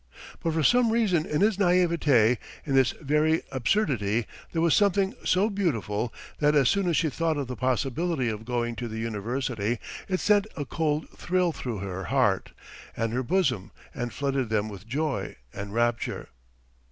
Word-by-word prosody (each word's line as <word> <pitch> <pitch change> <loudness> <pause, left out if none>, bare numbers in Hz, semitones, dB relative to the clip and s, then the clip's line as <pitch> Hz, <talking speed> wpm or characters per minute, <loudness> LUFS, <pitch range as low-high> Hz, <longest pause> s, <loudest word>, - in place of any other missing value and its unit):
But 165 - 0
for 160 -1 +1
some 245 - +4
reason 200 -9 +2
in 150 - 0
his 210 -1 +3
naïveté, 165 - +3 0.3
in 140 - -2
this 135 -1 +5
very 155 +2 +1
absurdity 120 - +1 0.3
there 165 - -1
was 165 -1 +3
something 200 -1 +3
so 190 +3 +3
beautiful 120 - -1 0.3
that 150 0 +3
as 135 -4 +5
soon 200 -3 +1
as 165 - +2
she 160 - +2
thought 165 0 0
of 140 - -1
the 125 0 -5
possibility 135 +3 0
of 110 -1 -3
going 120 0 -2
to 120 - -3
the 110 -1 -6
university, 115 +1 -2 0.3
it 185 -1 0
sent 210 0 +3
a 145 - -2
cold 150 +1 -1
thrill 180 -1 0
through 120 -9 -5
her 95 -1 -4
heart - - +1 0.5
and 115 0 -1
her 125 - 0
bosom 130 - 0 0.2
and 120 -1 -4
flooded 135 -3 -1
them 110 -1 0
with 100 0 -10
joy 145 +3 -2 0.2
and 100 0 -6
rapture. 120 +1 -1
140 Hz, 170 wpm, -27 LUFS, 115-170 Hz, 0.5 s, this